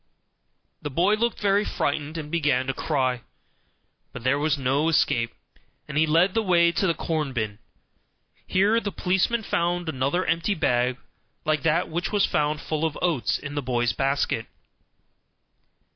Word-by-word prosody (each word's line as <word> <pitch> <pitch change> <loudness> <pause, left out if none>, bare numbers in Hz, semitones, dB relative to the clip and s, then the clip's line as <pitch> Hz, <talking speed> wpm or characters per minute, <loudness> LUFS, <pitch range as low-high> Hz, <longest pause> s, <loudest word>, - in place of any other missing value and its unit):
The 145 - -4
boy 175 +9 +2
looked 235 +2 0
very 205 0 +2
frightened 150 -3 -2
and 150 -2 -6
began 145 -6 +1
to 135 - -1
cry; 130 -4 -1 0.9
but 125 - -9
there 135 +3 +2
was 150 0 +1
no 140 +4 +1
escape, 115 -7 +2 0.6
and 150 - -7
he 155 +1 +3
led 170 +5 +3
the 225 - +2
way 170 -4 +4
to 190 - 0
the 170 - +1
corn 155 -4 -2
bin. 110 -4 -3 0.9
Here 205 +5 +3
the 205 -3 -4
policeman 190 +7 0
found 175 -2 -1
another 140 +5 0
empty 170 +5 0
bag 125 -5 +1 0.5
like 155 -2 +1
that 165 +2 +1
which 170 +3 -3
was 205 -2 +3
found 150 0 0
full 155 0 -3
of 160 -2 -1
oats 165 -9 0
in 145 -1 -7
the 145 - -2
boy's 120 -2 0
basket. 135 +3 0
155 Hz, 160 wpm, -25 LUFS, 135-175 Hz, 0.9 s, way